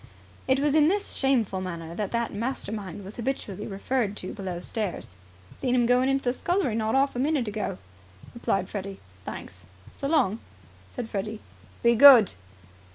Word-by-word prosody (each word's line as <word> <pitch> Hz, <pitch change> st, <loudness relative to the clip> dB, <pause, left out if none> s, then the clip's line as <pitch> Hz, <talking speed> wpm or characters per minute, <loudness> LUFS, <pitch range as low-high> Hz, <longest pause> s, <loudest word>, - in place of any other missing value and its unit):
It 265 Hz, 0 st, +3 dB
was 290 Hz, 0 st, +1 dB
in 305 Hz, -1 st, +5 dB
this 400 Hz, +4 st, 0 dB
shameful 235 Hz, -8 st, +1 dB
manner 170 Hz, -3 st, -6 dB
that 205 Hz, +2 st, -3 dB
that 235 Hz, 0 st, -1 dB
mastermind 205 Hz, -4 st, -4 dB
was 200 Hz, -, -10 dB
habitually 225 Hz, -5 st, -4 dB
referred 210 Hz, +1 st, -2 dB
to 185 Hz, -, -5 dB
below 185 Hz, -4 st, -5 dB
stairs. 195 Hz, -, -4 dB, 0.4 s
"Seen 255 Hz, -2 st, 0 dB
'im 240 Hz, -1 st, +3 dB
going 250 Hz, +2 st, +3 dB
into 270 Hz, 0 st, +1 dB
the 245 Hz, -, +1 dB
scullery 350 Hz, -, 0 dB
not 220 Hz, +1 st, 0 dB
'arf 275 Hz, 0 st, +2 dB
a -, -, -2 dB
minute 280 Hz, -3 st, +1 dB
ago," 210 Hz, 0 st, -3 dB, 0.6 s
replied 195 Hz, -5 st, -1 dB
Freddy. 195 Hz, -1 st, -6 dB, 0.3 s
"Thanks." 90 Hz, -2 st, -8 dB, 0.3 s
"So 275 Hz, -, -4 dB
long," 255 Hz, -9 st, +2 dB, 0.5 s
said 245 Hz, -3 st, -6 dB
Freddy. 215 Hz, 0 st, -4 dB, 0.4 s
"Be 235 Hz, 0 st, +5 dB
good!" 240 Hz, -4 st, +9 dB
230 Hz, 160 wpm, -26 LUFS, 195-265 Hz, 0.6 s, good